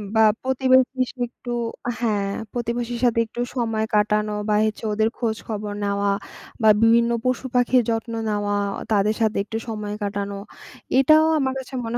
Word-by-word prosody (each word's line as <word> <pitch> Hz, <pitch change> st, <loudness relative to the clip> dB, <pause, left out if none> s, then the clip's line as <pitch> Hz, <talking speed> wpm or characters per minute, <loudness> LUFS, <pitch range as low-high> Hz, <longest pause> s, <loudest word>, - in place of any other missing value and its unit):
বা 220 Hz, -, +5 dB, 0.2 s
প্রতিবেশীর 260 Hz, 0 st, +3 dB
সাথে 250 Hz, -, -4 dB
একটু 245 Hz, 0 st, -9 dB, 0.4 s
আ -, -, +1 dB
হ্যা, 235 Hz, -2 st, +1 dB, 0.4 s
প্রতিবেশীর 240 Hz, 0 st, -3 dB
সাথে 230 Hz, -1 st, +2 dB
একটু 235 Hz, +2 st, -6 dB
সময় 225 Hz, -3 st, 0 dB
কাটানো 210 Hz, 0 st, +2 dB, 0.2 s
বা 210 Hz, -, +3 dB
হচ্ছে 215 Hz, +1 st, -3 dB
ওদের 220 Hz, +1 st, +2 dB
খোঁজ-খবর 220 Hz, -2 st, -3 dB
নেওয়া 200 Hz, 0 st, 0 dB, 0.5 s
বা 220 Hz, -, +6 dB
বিভিন্ন 235 Hz, +1 st, +4 dB
পশু-পাখির 255 Hz, 0 st, +2 dB
যত্ন 230 Hz, 0 st, -2 dB, 0.2 s
নেওয়া, 205 Hz, -1 st, -1 dB, 0.2 s
ও -, -, -6 dB
তাদের 210 Hz, +1 st, +2 dB
সাথে 220 Hz, -1 st, +1 dB
একটু 220 Hz, +2 st, -5 dB
সময় 210 Hz, -2 st, -4 dB
কাটানো 200 Hz, 0 st, -3 dB, 0.6 s
এটাও 310 Hz, +4 st, +6 dB
আমার 265 Hz, -2 st, 0 dB
কাছে 265 Hz, +1 st, -10 dB
মনে 230 Hz, +1 st, -2 dB
225 Hz, 155 wpm, -23 LUFS, 210-245 Hz, 0.6 s, বা